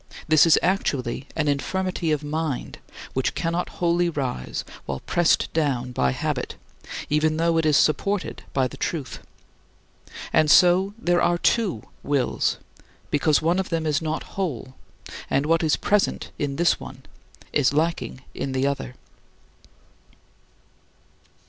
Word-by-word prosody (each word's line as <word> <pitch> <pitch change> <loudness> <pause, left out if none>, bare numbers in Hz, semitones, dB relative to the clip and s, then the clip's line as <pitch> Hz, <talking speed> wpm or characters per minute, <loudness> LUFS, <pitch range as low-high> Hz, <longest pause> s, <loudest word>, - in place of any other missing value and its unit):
This 155 +1 +6
is 160 - +6
actually 140 -8 -1
an 155 -2 0
infirmity 175 +4 -1
of 150 -1 0
mind, 150 -2 -3 0.3
which 130 - -1
cannot 170 +1 -1
wholly 175 0 +2
rise, 130 - -3 0.2
while 65 -1 -4
pressed 175 -2 +2
down 135 -6 0
by 65 - +1
habit, - - -3 0.5
even 155 +1 +1
though 165 0 +2
it 160 - +1
is 150 -2 +4
supported 200 +5 +1
by 130 -2 +1
the - - -11
truth. 150 -7 -3 1.1
And 155 - +4
so 185 +5 +5
there 175 -6 +1
are 175 - +3
two 190 - +1 0.2
wills, 140 -3 0 0.5
because 150 +1 +2
one 170 +3 +2
of 190 - -2
them 165 -2 -1
is 150 -1 +1
not 155 0 -2
whole, 140 - -3 0.6
and 140 - +1
what 165 +1 +3
is 160 -2 +2
present 210 -1 0
in 145 -2 -1
this 170 +3 +2
one - - -10 0.5
is 140 -3 +3
lacking 155 -3 -1
in 135 - -4
the 130 +1 +1
other. 140 -3 -2
155 Hz, 135 wpm, -24 LUFS, 140-175 Hz, 1.1 s, This